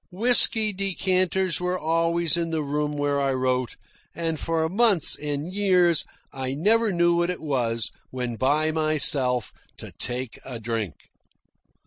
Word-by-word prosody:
Whisky 220 +1 +4
decanters 185 -2 0
were 180 +1 -1
always 165 0 +1
in 170 -1 -2
the 160 -2 -2
room 150 +1 -2
where 145 -1 -1
I 135 -1 0
wrote, 130 -1 -1 0.4
and 165 -2 -3
for 165 -1 -1
months 200 -2 +3
and 150 +4 -5
years 180 -5 +2 0.3
I 130 0 -4
never 215 +7 +2
knew 175 -1 +2
what 175 +1 0
it 180 - -4
was, 120 -7 -2 0.2
when 125 -2 -4
by 150 +6 +1
myself, 145 -6 +2 0.2
to - - -9
take 125 -1 -4
a 125 -3 -7
drink. 110 -6 -4
160 Hz, 140 wpm, -24 LUFS, 135-180 Hz, 0.4 s, Whisky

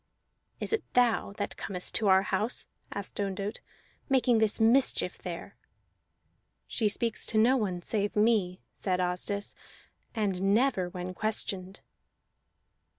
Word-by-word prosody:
"Is - - -1
it 445 - +1
thou 240 -5 +3
that 205 0 -4
comest 180 -2 -3
to 215 - +1
our 190 0 +6
house," 210 +4 0 0.3
asked 200 0 -6
Ondott, 200 +2 -3 0.5
"making 250 -3 +3
this 220 0 +2
mischief 240 +4 +3
there?" - - -7 1.1
"She 215 -3 0
speaks 230 +1 +1
to 220 - -1
no 235 +5 +5
one 185 -8 -1
save 205 0 -1
me," 210 -4 +2
said 185 -2 -1
Asdis, 180 +3 -2 0.6
"and 195 -2 +1
never 225 -7 +2
when 180 +1 -6
questioned." 195 -2 -2
205 Hz, 125 wpm, -29 LUFS, 190-225 Hz, 1.1 s, our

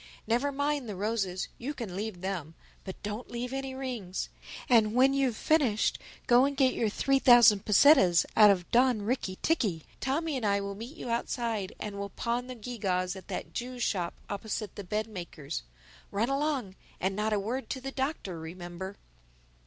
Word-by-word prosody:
Never 245 +6 +1
mind 285 -3 -1
the 205 - -4
roses—you 210 +6 -3
can 220 -9 -6
leave 205 -2 -4
them—but 185 0 -7
don't 210 +4 -5
leave 245 +2 -4
any 270 -1 -4
rings. 240 -9 -4 0.4
And 225 -3 +4
when 265 +2 +5
you've 265 -5 +1
finished 270 -9 +2 0.3
go 245 +1 +6
and 280 0 -2
get 265 -2 +4
your 225 - 0
three 275 +6 +2
thousand 240 -6 +7
pesetas 210 - +6
out 210 -1 +8
of 180 -3 +1
Don 245 -3 +4
Ricky 205 -4 -2
ticky. 200 - +1 0.2
Tommy 300 +4 -1
and 255 - -3
I 200 -1 +2
will 200 0 -4
meet 235 +10 -9
you 245 - -5
outside 230 -4 -2
and 205 -1 -5
we'll 200 0 -4
pawn 240 +4 -2
the 255 - -6
gew 240 +1 -7
gaws 185 -1 0
at 190 -2 -11
that - - -5
Jew's 245 0 -4
shop 175 -7 -1
opposite 205 0 -4
the 205 - -7
bed 210 +4 -1
maker's. 170 - -6 0.5
Run 220 +5 0
along—and 260 -9 -2
not 210 +1 0
a 210 - +2
word 240 +7 -3
to 265 - -3
the 270 +1 -5
Doctor, 265 - -3
remember." 175 +3 -7
220 Hz, 175 wpm, -29 LUFS, 195-255 Hz, 0.5 s, out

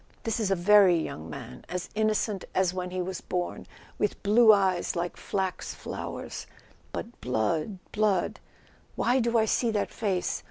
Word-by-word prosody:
This 225 0 -1
is 215 -3 0
a 195 - +3
very 190 0 +6
young 80 - -5
man, 65 -5 -8
as 180 -1 -3
innocent 215 -2 0
as 185 -1 +2
when 180 -1 -3
he 185 0 -2
was 185 0 -5
born, 180 -1 -3 0.3
with 210 - -1
blue 220 +2 +7
eyes 190 -4 +2
like 175 0 -2
flax 190 -2 -3
flowers, - - -6 0.4
but 235 +1 -7
blood, 125 - 0
blood... 205 -4 +1 0.6
why 250 +2 +2
do 235 -1 +2
I 220 - +4
see 235 +2 +1
that 210 -2 -1
face? 190 -5 -1
190 Hz, 160 wpm, -28 LUFS, 180-215 Hz, 0.6 s, blue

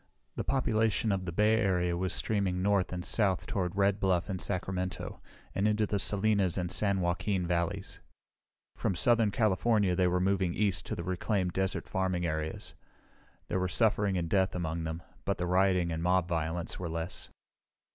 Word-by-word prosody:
The - - -2
population 110 -4 +1
of 95 -2 -1
the 85 - -3
Bay 105 +5 +3
Area 90 -5 +1
was 90 +1 -1
streaming 95 -2 0
north 100 -2 +2
and 90 -1 -4
south 100 -5 +1
toward 90 -3 -2
Red 100 0 +2
Bluff 95 0 +1
and 95 - -3
Sacramento, 95 -1 -3 0.3
and 100 +2 +1
into 105 0 +2
the 100 -1 -1
Salinas 100 -3 +2
and 90 -2 -2
San 100 -2 +2
Joaquin 90 +2 0
valleys. 85 -1 -2 0.8
From 95 - -1
southern 115 +4 +3
California 105 -2 +2
they 90 0 +3
were 90 +1 +1
moving 95 -2 +1
east 100 -3 0
to - - -3
the 85 - -5
reclaimed 90 0 -1
desert 95 0 -1
farming 95 -2 -1
areas. 80 -1 -3 0.7
There 95 - -1
were 90 - 0
suffering 100 +3 +2
and 85 -1 -1
death 95 +2 +1
among 80 -1 -3
them, 80 +2 -5 0.2
but 100 - -1
the 90 - -2
rioting 90 -1 +2
and 80 0 -3
mob 90 0 +2
violence 80 0 -3
were 90 -2 -4
less. 85 +2 -5
95 Hz, 175 wpm, -30 LUFS, 90-100 Hz, 0.8 s, Bay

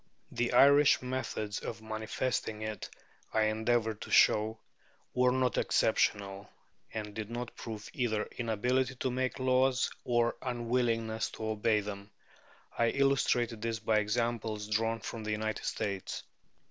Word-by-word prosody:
The 120 0 -1
Irish 140 +2 +6
methods 125 -5 -3
of 115 - -6
manifesting 110 0 -2
it, 110 -1 -5 0.5
I 110 - +4
endeavoured 110 0 +1
to - - -7
show, 110 +1 +4 0.6
were 125 0 +4
not 130 0 +1
exceptional, 100 0 +1 0.4
and 105 -1 -5
did 110 0 -5
not 120 0 -5
prove 110 -2 -7
either 110 -4 0
inability 125 +3 0
to 130 0 -2
make 130 +1 -1
laws 130 0 +2
or 120 -1 +1
unwillingness 115 -2 0
to 110 - -5
obey 110 0 +2
them. 100 0 -7 0.7
I 115 - +3
illustrated 125 -4 +2
this 115 0 -1
by 110 -1 +2
examples 110 0 -1
drawn 115 +1 0
from 115 - -6
the 105 0 -1
United 110 0 -2
States. 100 -3 -3
115 Hz, 135 wpm, -31 LUFS, 110-125 Hz, 0.7 s, Irish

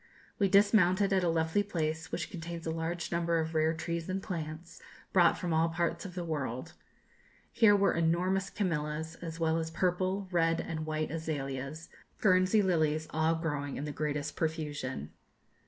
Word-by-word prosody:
We 200 -2 +3
dismounted 200 -1 +4
at 190 -1 +3
a 175 - +2
lovely 160 +4 +2
place, 160 -5 -2
which - - -3
contains 170 -1 -6
a 160 - -1
large 165 +1 -3
number 170 0 +1
of 160 0 -2
rare 160 0 +3
trees 170 +1 -3
and 190 +1 -1
plants, 165 -2 -6 0.3
brought 175 -3 +5
from 175 -2 -2
all 160 +1 +3
parts 170 +4 -1
of 180 -2 -8
the 180 - -3
world. 145 -1 -3 0.8
Here 210 -3 +6
were 200 0 +3
enormous 180 +3 +1
camellias, 160 -4 -2
as 165 -1 -6
well 160 0 +2
as 160 0 -3
purple, 185 +3 0
red, 165 -1 +2
and 155 -2 -4
white 155 -1 -2
azaleas, 150 -1 -4 0.3
Guernsey 185 +1 +4
lilies, 155 -4 +1
all 160 +1 +2
growing 145 -4 -3
in 145 - -3
the 150 - -3
greatest 150 0 -2
profusion. 145 - -3
165 Hz, 165 wpm, -31 LUFS, 155-180 Hz, 0.8 s, Here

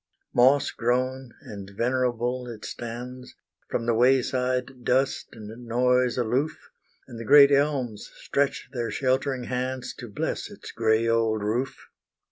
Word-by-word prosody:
Moss 130 +4 +4
grown, 130 +1 -1
and 100 -2 -9
venerable 125 0 0
it 115 -3 -8
stands, 125 +2 -7 0.3
From 115 - -2
the 120 - +2
way 125 +3 +4
side 125 0 -2
dust 130 +2 +1
and 115 +2 -10
noise 125 +1 +2
aloof, 125 +6 -1 0.4
And 115 - -9
the - - -5
great 140 +4 +8
elms 140 -7 0
stretch 140 0 -1
their 120 -3 -2
sheltering 130 0 0
hands 125 +1 -3
To 120 - -7
bless 100 - -3
its - - -10
grey 110 0 +2
old 115 -2 +1
roof. 120 +6 -2
125 Hz, 135 wpm, -26 LUFS, 115-130 Hz, 0.4 s, great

